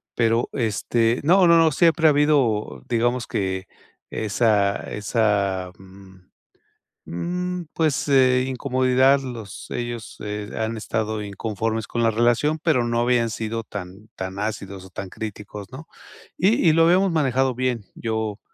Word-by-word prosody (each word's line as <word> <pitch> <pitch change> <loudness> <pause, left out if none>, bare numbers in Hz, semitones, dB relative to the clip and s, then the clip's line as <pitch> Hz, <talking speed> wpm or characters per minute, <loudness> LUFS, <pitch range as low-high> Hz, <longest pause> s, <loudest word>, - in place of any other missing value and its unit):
pero, 115 0 +1
este, 115 0 0
no, 180 +5 +5
no, 165 -2 +5
siempre 165 +2 +4
ha - - +7
habido, 140 -8 +1
digamos 120 +1 0
que 95 -4 -2 0.4
esa 105 -2 +1 0.2
esa, 100 -4 0
mm, 95 0 -16 0.9
mm, 180 - -3
pues, 150 -3 0
eh, 130 -2 +4
incomodidad 130 +1 +2
los 115 -6 -8
ellos, 120 -2 -5
eh, 105 0 -5
han 110 +1 -2
estado 110 0 -2
inconformes 110 +2 -3
con 120 - -1
la 115 - +3
relación, 120 +7 +2
pero 150 -8 +2
no 120 0 0
habían 120 -1 +2
sido 115 +1 -3
tan 100 0 -9
tan 95 +1 -5
ácidos 100 -3 -5
o - - -13
tan 95 +1 -7
críticos, 105 -1 -8
¿no?, 150 +5 -10 0.5
y 195 0 +3
y - - +4
lo 165 +1 +5
habíamos 185 +3 +4
manejado 135 -4 +1
bien. 125 -4 -1
Yo 110 -2 -3
115 Hz, 140 wpm, -23 LUFS, 105-135 Hz, 0.9 s, ha